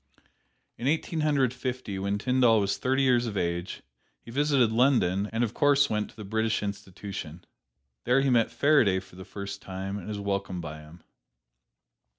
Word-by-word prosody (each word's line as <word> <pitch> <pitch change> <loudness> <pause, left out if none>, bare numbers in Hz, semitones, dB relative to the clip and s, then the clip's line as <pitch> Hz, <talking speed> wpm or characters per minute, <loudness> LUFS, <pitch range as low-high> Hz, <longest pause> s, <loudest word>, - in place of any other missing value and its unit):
In 125 - -2
Eighteen 160 +2 0
Hundred 140 -5 +2
Fifty, 125 -5 -4
when 100 +1 -1
Tyndall 125 0 +3
was 100 -1 0
thirty 130 +1 +1
years 125 -2 +3
of 105 -3 -4
age, 85 0 -3 0.4
he 115 - -12
visited 140 -3 +2
London, 110 -5 +2
and 115 +1 0
of 115 -1 -2
course 140 -2 +3
went 105 -1 -1
to - - -18
the 105 - -9
British 110 +1 0
Institution. 100 -4 -6 0.6
There 125 +3 +4
he 135 -1 +2
met 115 -2 +3
Faraday 130 -11 +3
for 95 -1 -16
the 95 0 -10
first 100 0 -7
time 95 +1 -5
and 90 - -10
was 105 -1 -4
welcomed 100 -3 -3
by 75 -1 -7
him. 75 +3 -15
105 Hz, 170 wpm, -27 LUFS, 95-130 Hz, 0.6 s, There